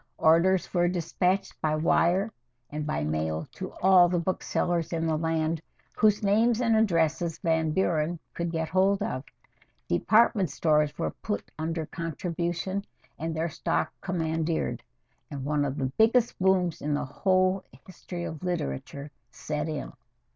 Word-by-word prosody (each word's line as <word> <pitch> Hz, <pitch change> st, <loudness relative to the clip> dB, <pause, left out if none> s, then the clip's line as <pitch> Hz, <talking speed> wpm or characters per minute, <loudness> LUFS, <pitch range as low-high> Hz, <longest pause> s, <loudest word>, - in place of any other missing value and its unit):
Orders 170 Hz, +4 st, +3 dB
were 175 Hz, -1 st, +3 dB
despatched 180 Hz, +2 st, -1 dB
by 155 Hz, -1 st, +1 dB
wire 175 Hz, +6 st, +2 dB, 0.4 s
and 150 Hz, 0 st, -4 dB
by 75 Hz, -, -1 dB
mail 80 Hz, +1 st, -2 dB
to 185 Hz, -, -7 dB
all 185 Hz, -2 st, +7 dB
the 175 Hz, -, +1 dB
booksellers 175 Hz, -1 st, -1 dB
in 165 Hz, -1 st, -1 dB
the 160 Hz, -1 st, +1 dB
land 160 Hz, 0 st, 0 dB, 0.3 s
whose 210 Hz, -1 st, +3 dB
names 220 Hz, +3 st, +3 dB
and 230 Hz, -2 st, +3 dB
addresses 165 Hz, -5 st, +1 dB
Van 160 Hz, -1 st, +1 dB
Buren 165 Hz, -1 st, 0 dB, 0.2 s
could 170 Hz, -1 st, -3 dB
get 160 Hz, -1 st, -1 dB
hold 195 Hz, +3 st, +2 dB
of. 130 Hz, -11 st, -3 dB, 0.6 s
Department 205 Hz, -, +3 dB
stores 150 Hz, 0 st, +1 dB
were -, -, -1 dB
put 210 Hz, -, -5 dB
under 160 Hz, 0 st, -2 dB
contribution 170 Hz, +4 st, -3 dB, 0.4 s
and 160 Hz, +1 st, -3 dB
their 165 Hz, +2 st, -1 dB
stock -, -, -1 dB
commandeered, 165 Hz, -2 st, -1 dB, 0.5 s
and 140 Hz, -2 st, -6 dB
one 150 Hz, 0 st, +1 dB
of 140 Hz, 0 st, -2 dB
the 130 Hz, -2 st, -1 dB
biggest 230 Hz, +2 st, +3 dB
booms 185 Hz, -3 st, +2 dB
in 150 Hz, 0 st, 0 dB
the 145 Hz, -, -2 dB
whole 185 Hz, +5 st, +1 dB, 0.2 s
history 180 Hz, -1 st, -7 dB
of 160 Hz, -3 st, -6 dB
literature 140 Hz, -, -4 dB, 0.2 s
set 150 Hz, +5 st, -4 dB
in. 150 Hz, -2 st, -5 dB
170 Hz, 145 wpm, -27 LUFS, 155-185 Hz, 0.6 s, all